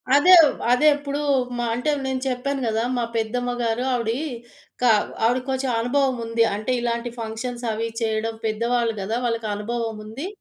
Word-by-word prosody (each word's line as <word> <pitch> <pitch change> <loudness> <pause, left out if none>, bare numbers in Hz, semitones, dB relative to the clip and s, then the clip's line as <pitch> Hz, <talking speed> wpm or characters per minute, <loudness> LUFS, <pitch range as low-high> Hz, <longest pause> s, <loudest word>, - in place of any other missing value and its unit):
అదే 360 +6 +8
వ్ 285 - +1 0.2
అదే 300 +5 +4
ఇప్పుడూ 285 0 -4 0.4
మా 240 - -1
అంటే, 250 +6 0
నేను 265 -1 -2
చెప్పాను 265 +2 -2
గదా! 225 +1 0
మా 240 - 0
పెద్దమ్మ 245 +2 -1
గారు 230 +2 0
ఆవిడి 230 -1 0 0.7
కావ్ 220 -4 +4 0.2
ఆవిడికి 255 +3 +1
కొంచెం 265 0 -1
అనుభవం 260 +2 +1
ఉంది. 230 0 +2
అంటే, 215 +4 -3
ఇలాంటి 235 0 -1
ఫంక్షన్సవీ 230 0 -3
చేయడం, 220 0 -1
పెద్దవాళ్ళు 230 +1 0
గదా! 220 +4 -2
వాళ్ళకనుభవముంది, 225 - -3
235 Hz, 145 wpm, -23 LUFS, 225-255 Hz, 0.7 s, అదే